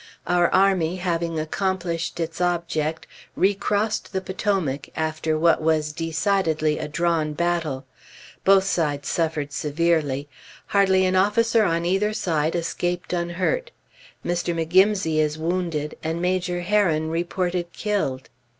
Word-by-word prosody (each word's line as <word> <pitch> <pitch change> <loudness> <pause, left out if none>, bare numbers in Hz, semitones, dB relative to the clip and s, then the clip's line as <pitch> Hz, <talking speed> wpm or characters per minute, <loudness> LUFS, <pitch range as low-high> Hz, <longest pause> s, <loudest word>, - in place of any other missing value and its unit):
Our 175 -1 +2
army, 185 -3 +3
having 170 -3 -1
accomplished 175 +1 -2
its 165 +1 -3
object, 170 -3 -1 0.3
recrossed 205 +2 0
the 190 - +1
Potomac, 185 -8 -2
after 160 0 -1
what 165 0 +3
was 155 -1 +1
decidedly 165 -2 0
a - - -3
drawn 160 -1 0
battle. 165 -5 -1 0.6
Both 195 0 +6
sides 150 -7 -1
suffered 155 -3 -1
severely. 150 -2 0 0.4
Hardly 190 -2 +3
an 185 0 +1
officer 220 +4 +3
on 170 -1 0
either 195 +4 +1
side 160 -7 0
escaped 175 +1 -2
unhurt. 180 - -1 0.6
Mr. 175 0 -1
McGimsey 175 0 +3
is 155 0 +1
wounded, 165 -2 -2
and 160 +1 -2
Major 180 0 0
Herron 175 -5 +1
reported 175 +1 -2
killed. 165 -12 -2
170 Hz, 120 wpm, -23 LUFS, 160-185 Hz, 0.6 s, Both